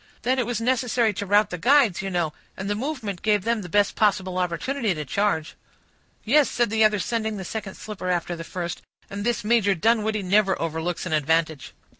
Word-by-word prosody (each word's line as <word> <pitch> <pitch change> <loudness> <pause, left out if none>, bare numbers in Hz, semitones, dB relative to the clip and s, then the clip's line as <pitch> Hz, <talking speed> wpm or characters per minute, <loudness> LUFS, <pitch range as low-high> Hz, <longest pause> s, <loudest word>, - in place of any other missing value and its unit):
"Then 255 +2 +1
it 240 - 0
was 240 -2 -2
necessary 240 -2 +1
to 205 +1 -5
rout 205 +1 +3
the 180 - -4
guides, 245 - +4
you 195 - -4
know, 170 -4 -1 0.2
and 190 - -5
the 205 - 0
movement 225 - -4
gave 210 -3 +2
them 230 0 0
the 180 - -8
best 205 +3 +2
possible 190 -3 +1
opportunity 195 +5 -1
to 150 -1 -5
charge." 160 +1 -1 0.7
"Yes," 285 +5 +4
said 240 -3 0
the 220 0 +3
other, 215 -1 +4
sending 220 +1 -2
the 190 - -6
second 205 0 -5
slipper 205 -4 -6
after 175 -1 -1
the 165 - -7
first, 175 0 -5 0.3
"and 200 +1 -4
this 235 -1 -1
Major 210 -3 +3
Dunwoodie 215 +2 +1
never 195 +1 +2
overlooks 165 +2 -3
an 175 - -3
advantage." 155 -1 0
205 Hz, 200 wpm, -24 LUFS, 180-225 Hz, 0.7 s, guides